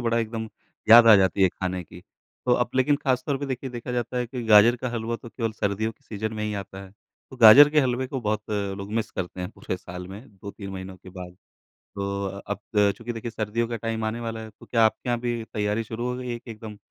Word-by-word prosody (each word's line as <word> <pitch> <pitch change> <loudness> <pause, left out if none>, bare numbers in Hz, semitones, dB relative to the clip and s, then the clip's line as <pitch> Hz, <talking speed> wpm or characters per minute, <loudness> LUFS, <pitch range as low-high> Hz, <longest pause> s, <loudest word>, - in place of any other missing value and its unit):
कि - - +3
एकदम 110 0 -5 0.4
याद 115 0 +10
आ 110 - +10
जाती 95 0 +3
है 95 - +5
खाने 90 -1 -4
की। - - -14 0.4
तो 125 - +4
अब 120 - 0
लेकिन 130 +3 +3
ख़ास 130 -2 +1
तौर 140 -2 0
पे 140 - -4
देखिए 130 0 -4
देखा 120 0 -6
जाता 125 +1 -2
है 125 - 0
कि 125 -1 -5
गाजर 110 +2 +7
का 125 0 -4
हलवा 115 0 -3
तो 115 - -11
केवल 115 -2 -3
सर्दियों 110 +1 -1
के - - -31
सीज़न 110 +1 -4
में 105 -1 -4
ही 105 0 -2
आता 95 0 -11
है। 95 - -14 0.4
तो - - -9
गाजर 140 +7 +10
के 150 0 +3
हलवे 130 0 -1
को 135 - -4
बहुत 105 0 -1 0.3
लोग 100 +1 -7
मिस 115 -1 -1
करते 90 0 -5
हैं 90 - -4
पूरे 95 - -5
साल 90 0 -9
में 100 +3 -9 0.2
2-3 100 0 -8
महीनों 95 0 -7
के 95 - -14
बाद। 90 -1 -9 0.6
तो 100 0 -2 0.3
अब 100 - -12 0.4
चूँकि 120 +1 -5
देखिए 115 0 -6
सर्दियों 110 +1 -2
का 115 - -4
टाइम 115 0 -3
आने 110 +2 -2
वाला 115 -1 -4
है, 110 0 -8
तो 105 - -17
क्या 115 -2 +2
आपके 110 +3 -1
यहाँ 120 - 0
भी 120 -1 -2
तैयारी 105 +1 -1
शुरू 115 +2 -5
हो - - -3
गई 125 -1 -6
है 120 - -2
एक 120 - -13
एकदम 110 -2 -9
110 Hz, 250 wpm, -25 LUFS, 100-120 Hz, 0.6 s, याद